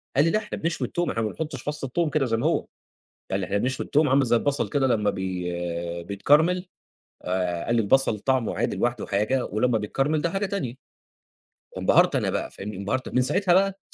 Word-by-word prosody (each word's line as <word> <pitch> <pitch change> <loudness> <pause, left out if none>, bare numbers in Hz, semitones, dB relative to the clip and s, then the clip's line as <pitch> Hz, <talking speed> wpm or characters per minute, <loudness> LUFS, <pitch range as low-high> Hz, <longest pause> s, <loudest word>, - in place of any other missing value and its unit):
قال 140 +3 +5
لي: 165 - +2
"لأ 215 - +2
إحنا - - -6
بنشوي 165 +2 -1
التوم، 175 -1 -2
إحنا 115 - -1
ما 110 - -1
بنحطش 150 0 -5
فص 150 0 -4
التوم 155 +5 0
كده 150 -2 +1
زي 115 -2 0
ما 120 - -2
هو"، 165 - +1 0.7
قال 95 - 0
لي: 95 - -2
"إحنا 100 +2 -1
بنشوي 130 +5 -1
التوم 150 0 +2
عامل 135 +1 +4
زي 120 0 +3
البصل 140 +5 0
كده 140 -3 +1
لمّا 105 -4 +2
بي 85 -2 -3
بيتكرمل"، 155 - +2 0.6
آآ، 90 -2 -1
قال 120 - +1
لي: - - +4
"البصل 115 +1 +3
طعمه 130 +1 0
عادي - - 0
لوحده 120 0 -1
حاجة 105 +6 0
ولمّا 110 +3 +1
بيتكرمل 135 +8 0
ده 170 - 0
حاجة 195 +3 -1
تانية"، 170 -12 -3 1.0
انبهرت - - +4
أنا - - 0
بقى، - - -3
فاهمني، 100 +1 -7
انبهرت 100 +7 -2
من 125 - +1
ساعتها 175 +8 +2
بقى 195 +1 +2
125 Hz, 205 wpm, -25 LUFS, 100-150 Hz, 1.0 s, قال